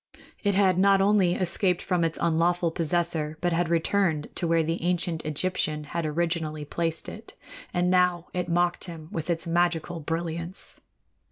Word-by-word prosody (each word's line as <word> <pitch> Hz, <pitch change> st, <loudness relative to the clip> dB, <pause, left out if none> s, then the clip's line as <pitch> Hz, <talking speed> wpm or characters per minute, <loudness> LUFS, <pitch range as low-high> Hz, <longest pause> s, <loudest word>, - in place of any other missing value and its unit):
It 200 Hz, -2 st, +1 dB
had 190 Hz, -2 st, +3 dB
not 195 Hz, 0 st, +5 dB
only 195 Hz, -3 st, +3 dB
escaped 180 Hz, 0 st, +2 dB
from 180 Hz, -2 st, 0 dB
its 165 Hz, -1 st, 0 dB
unlawful 170 Hz, +1 st, +1 dB
possessor, 160 Hz, -2 st, 0 dB
but 175 Hz, -1 st, 0 dB
had 170 Hz, 0 st, 0 dB
returned 170 Hz, -2 st, +1 dB
to 175 Hz, -, -1 dB
where 165 Hz, 0 st, +3 dB
the 165 Hz, +2 st, -2 dB
ancient 175 Hz, -1 st, 0 dB
Egyptian 155 Hz, -1 st, -1 dB
had 160 Hz, +2 st, -3 dB
originally 155 Hz, -1 st, -2 dB
placed 165 Hz, +2 st, -2 dB
it; 220 Hz, +1 st, -10 dB, 0.4 s
and 180 Hz, 0 st, +1 dB
now 180 Hz, -2 st, +2 dB
it 180 Hz, -1 st, -2 dB
mocked 175 Hz, +1 st, +1 dB
him 165 Hz, -3 st, -9 dB
with 165 Hz, +1 st, -4 dB
its 165 Hz, -1 st, 0 dB
magical 170 Hz, 0 st, 0 dB
brilliance. 165 Hz, +3 st, -4 dB
170 Hz, 160 wpm, -26 LUFS, 165-180 Hz, 0.4 s, not